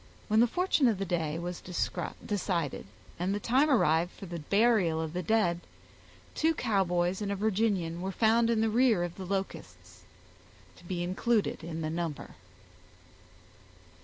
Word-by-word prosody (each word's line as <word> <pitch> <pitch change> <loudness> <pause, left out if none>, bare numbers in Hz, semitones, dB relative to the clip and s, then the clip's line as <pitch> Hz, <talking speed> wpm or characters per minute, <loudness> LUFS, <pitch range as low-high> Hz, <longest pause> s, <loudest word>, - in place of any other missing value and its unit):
When 215 +1 +4
the 240 - +6
fortune 350 -1 +2
of 220 -4 +2
the 195 - -2
day 165 -3 -1
was 175 +1 -5
decided, 175 - -3 0.3
and 185 +3 0
the - - -2
time 260 +8 +2
arrived 170 - +3
for - - -10
the 170 -2 -6
burial 200 -1 +2
of 160 -1 -3
the 180 - -2
dead, 180 -3 +1 0.7
two 320 +1 +1
Cowboys 185 -5 0
and 200 -1 -2
a - - 0
Virginian 195 -5 0
were 190 +1 -3
found 230 +3 +3
in 225 -2 +2
the 225 - +2
rear 230 -5 +3
of 175 -1 -4
the 190 - -8
Locusts, 195 0 -5 0.8
to 175 - -17
be 175 -1 -3
included 200 +3 0
in 165 0 -5
the 155 0 -2
number. 165 -3 -4
190 Hz, 160 wpm, -30 LUFS, 170-220 Hz, 0.8 s, the